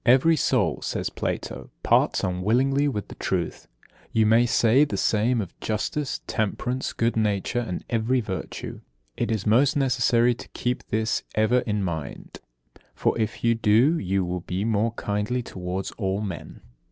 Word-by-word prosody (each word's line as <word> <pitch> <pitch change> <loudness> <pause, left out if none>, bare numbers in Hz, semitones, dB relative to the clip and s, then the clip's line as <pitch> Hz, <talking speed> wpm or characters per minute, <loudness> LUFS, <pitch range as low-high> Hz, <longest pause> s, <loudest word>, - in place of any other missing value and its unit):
63. 120 - +9
"Every 160 +5 +3
soul," - - +1
says - - -2
Plato, - - -4
"parts - - +3
unwillingly 125 +10 +2
with 105 -8 -4
truth." - - -2 0.4
You 110 -1 +3
may 115 +3 +5
say 120 +3 +4
the 150 - -2
same 115 +3 +2
of 95 - -9
justice, 130 +6 -2
temperance, 125 +4 -2
good 115 +1 0
nature, 105 +1 0
and 95 -7 -4
every 120 +3 +1
virtue. 105 -5 -5 0.3
It - - -1
is 110 -3 -1
most 135 +7 +4
necessary 125 -3 +3
to 120 - -10
keep 125 0 -2
this 110 +1 0
ever 110 +3 +3
in 105 -2 0
mind; 80 -5 -5 0.6
for, - - +1
if 110 -1 -2
you 115 0 +4
do, 115 +8 +3
you 95 0 0
will 90 +1 -2
be 90 +4 -3
more 110 +1 +1
kindly 105 +4 -2
towards 90 -1 -4
all 95 -1 0
men. 95 -7 -6
110 Hz, 155 wpm, -25 LUFS, 100-125 Hz, 0.6 s, 63